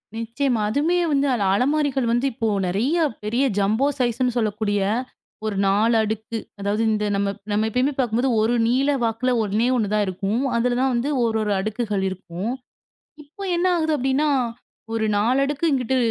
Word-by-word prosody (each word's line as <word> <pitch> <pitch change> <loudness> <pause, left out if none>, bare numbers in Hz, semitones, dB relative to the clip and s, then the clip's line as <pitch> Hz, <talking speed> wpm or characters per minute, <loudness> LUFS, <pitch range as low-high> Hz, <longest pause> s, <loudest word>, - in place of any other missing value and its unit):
நிச்சயமா. 230 +1 -1
அதுமே 300 +10 +1
வந்து 280 0 +2
அ 245 - +1 0.2
அலமாரிகள் 270 +1 +1
வந்து 240 +3 +1
இப்போ 230 -1 -2 0.2
நிறைய 230 - 0 0.3
பெரிய 235 +5 0
ஜம்போ 215 +7 +2
சைஸ்ன்னு 245 0 0
சொல்லக்கூடிய 210 -2 0 0.7
ஒரு 215 -2 -2
4 210 +4 +3
அடுக்கு 220 +1 -3 0.2
அதாவது 200 +2 -1
இந்த 210 -1 0
நம்ம, 200 0 0 0.2
நம்ம 210 +1 +1
எப்பயுமே 255 +5 +1
பார்க்கும்போது 245 0 +1
ஒரு 225 +2 +2
நீள 260 +4 +2
வாக்குல 230 +3 0
ஒண்ணே 215 +3 0
1 210 -4 -1
தான் 210 -1 +2
இருக்கும். 195 +5 -1
அதுலதான் 250 +2 +1
வந்து 240 +4 0
ஒரு 225 -1 +1
ஒரு 210 -1 -1
அடுக்குகள் 210 -1 -2
இருக்கும். 185 +3 -5 0.7
இப்போ 305 +8 -11
என்ன 345 +1 0
ஆகுது 315 -1 0
அப்பிடின்னா 270 +2 +1 0.6
ஒரு 225 -1 0
4 235 +6 +2
அடுக்கு 290 +3 -2
இங்கிட்டு 260 -1 +1
230 Hz, 155 wpm, -22 LUFS, 210-265 Hz, 0.7 s, 4